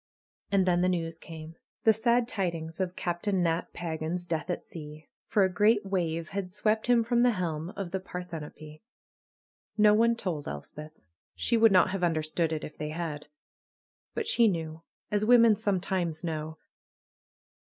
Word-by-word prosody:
And 195 -2 +3
then 175 -1 +2
the 180 - +3
news 165 -2 -2
came. 160 0 -10 0.3
The 220 - +6
sad 235 +2 +2
tidings 170 -6 -3
of 185 -1 -2
Cap 175 -1 -3
tain 195 -4 +1
Nat 165 0 0
Pagan's 165 +1 -4
death 165 0 -3
at 175 - -2
sea, 150 -1 -10 0.2
for 205 - +3
a - - +4
great 210 +1 +3
wave 170 -4 -1
had 195 0 -3
SAvept 215 +3 0
him 240 -1 +4
from 235 +1 +2
the 245 -1 +4
helm 165 -2 -2
of 190 -3 -5
the 190 - -1
Parthenope. 160 -4 -8 1.0
No 210 -1 +6
one 230 +2 +4
told 175 -10 -3
Elspeth. 150 - -8 0.4
She 235 - +1
would 225 -1 +6
not 185 0 +5
have 190 -1 -3
understood 160 0 0
it 155 -1 -3
if 150 - -9
they 150 - -3
had. 155 -2 -5 0.9
But 455 - -1
she 235 - +4
knew, 160 -4 -2 0.3
as 210 0 +1
Avomen 230 -1 +6
sometimes 185 -5 -1
know. 160 -1 -4
175 Hz, 165 wpm, -29 LUFS, 160-210 Hz, 1.0 s, The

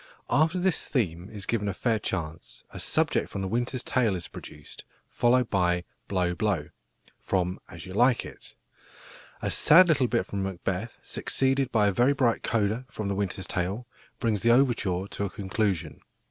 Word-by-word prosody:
After 160 +4 +3
this 180 -1 +1
theme 90 - -2
is 105 -3 -6
given 105 -3 -1
a 100 - -2
fair 115 0 +1
chance, 80 -10 -5
a - - -8
subject - - +1
from 95 - -4
The - - -2
Winter's 120 +4 -1
Tale 115 -6 +1
is 85 -3 -5
produced, 75 -1 -11 0.3
followed 125 0 +2
by 90 -2 +2 0.2
"Blow, 90 -2 0
blow," 90 -6 -1 0.5
from 90 -1 -1
As 85 -2 -9
You 95 - -8
Like 120 +3 +3
It. - - -11 0.9
A - - 0
sad 175 +4 +7
little 140 -5 +3
bit 115 -1 0
from 100 - -4
Macbeth, 95 +3 -3
succeeded 135 -1 0
by 105 -3 +3
a 100 - +3
very 120 +7 +3
bright 125 -4 +1
coda 115 +3 0
from 110 -5 -4
The 100 - -1
Winter's 95 -1 -2
Tale, 95 +7 -2 0.3
brings 110 -5 0
the 115 - +3
overture 115 -8 +3
to 100 - -3
a - - -3
conclusion. 95 -4 -2
105 Hz, 175 wpm, -27 LUFS, 95-120 Hz, 0.9 s, sad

